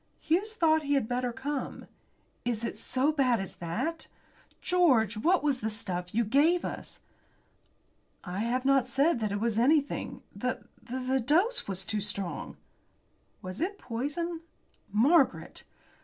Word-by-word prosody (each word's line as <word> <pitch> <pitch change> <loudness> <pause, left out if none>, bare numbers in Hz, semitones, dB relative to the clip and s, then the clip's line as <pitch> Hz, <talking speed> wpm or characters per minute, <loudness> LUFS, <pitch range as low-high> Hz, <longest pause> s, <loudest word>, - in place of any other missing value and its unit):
"Hughes 395 +8 0
thought 315 -5 +4
that 295 - -9
he 285 - +3
had 270 -6 +1
better 245 0 -1
come." 270 +3 -4 0.6
"Is 235 -2 -1
it - - -3
so 265 +4 +1
bad 260 -6 +2
as 195 - -5
that? 310 - -3 0.5
George, 260 - +3
what 335 +12 +2
was 285 -4 +1
that 220 - -1
stuff 180 -4 -3
you 235 +2 +2
gave 295 - +3
us?" - - -6 1.2
"I 180 +1 -5
have 245 +4 -1
not 270 -2 +4
said 275 +3 +2
that 215 -2 -1
it 205 - -1
was 225 0 0
anything. 285 +3 +1
The - - -3 0.2
the 260 +1 -1
dose 355 - +2
was 190 -1 -3
too 210 +1 -1
strong." 195 -3 -4 0.9
"Was 185 +5 -6
it 395 +4 -1
poison?" 295 +8 -3 0.5
"Margaret!" 270 - +2
255 Hz, 145 wpm, -29 LUFS, 220-315 Hz, 1.2 s, thought